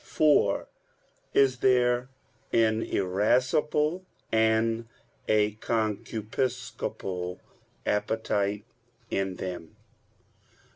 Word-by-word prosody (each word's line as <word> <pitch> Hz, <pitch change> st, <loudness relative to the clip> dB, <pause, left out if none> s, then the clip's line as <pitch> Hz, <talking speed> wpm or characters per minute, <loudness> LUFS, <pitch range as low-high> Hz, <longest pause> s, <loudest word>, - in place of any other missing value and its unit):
(4) 145 Hz, -10 st, +3 dB, 0.7 s
Is 130 Hz, -2 st, +4 dB
there 125 Hz, 0 st, +3 dB, 0.4 s
an 110 Hz, -1 st, +3 dB
irascible 130 Hz, -, +1 dB, 0.3 s
and 110 Hz, +1 st, +2 dB, 0.4 s
a 105 Hz, -1 st, +3 dB
concupiscible 110 Hz, -4 st, -3 dB, 0.5 s
appetite 105 Hz, -1 st, 0 dB, 0.5 s
in 95 Hz, -1 st, -1 dB
them? 90 Hz, -3 st, -6 dB
110 Hz, 60 wpm, -28 LUFS, 100-125 Hz, 0.7 s, Is